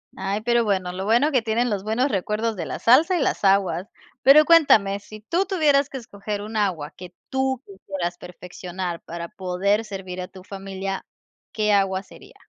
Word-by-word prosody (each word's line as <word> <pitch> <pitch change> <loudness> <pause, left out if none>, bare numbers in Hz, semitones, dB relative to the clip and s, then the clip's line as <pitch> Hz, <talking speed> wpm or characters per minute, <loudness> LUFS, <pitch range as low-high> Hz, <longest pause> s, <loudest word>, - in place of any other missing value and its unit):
Ay, 195 +2 -2
pero 235 +1 +2
bueno, 190 -4 0
lo 190 +2 -5
bueno 240 +8 +3
que 260 -4 +3
tienen 230 +2 0
los 200 -3 -2
buenos 225 +6 0
recuerdos 215 +4 -1
de 175 -4 -4
la - - -4
salsa 315 +10 +5
y - - 0
las 265 - -1
aguas. 195 -2 +2 0.3
Pero 295 +3 +7
cuéntame, 220 -13 +5
si 215 +1 -12
tú 340 - 0
tuvieras 300 -7 +2
que 270 - -6
escoger 205 -3 -6
un 215 +2 -7
agua 180 -8 -1
que 180 -1 -11 0.2
tú 265 -1 -1
quisieras 190 -3 -5
perfeccionar 180 0 -7
para 170 0 -7
poder 190 +3 0
servir 190 -3 -6
a 180 - -5
tu 185 -1 -14
familia, 195 0 -5 0.5
¿qué 210 -1 +1
agua 195 -1 +1
sería? - - -16
200 Hz, 185 wpm, -23 LUFS, 190-235 Hz, 0.5 s, Pero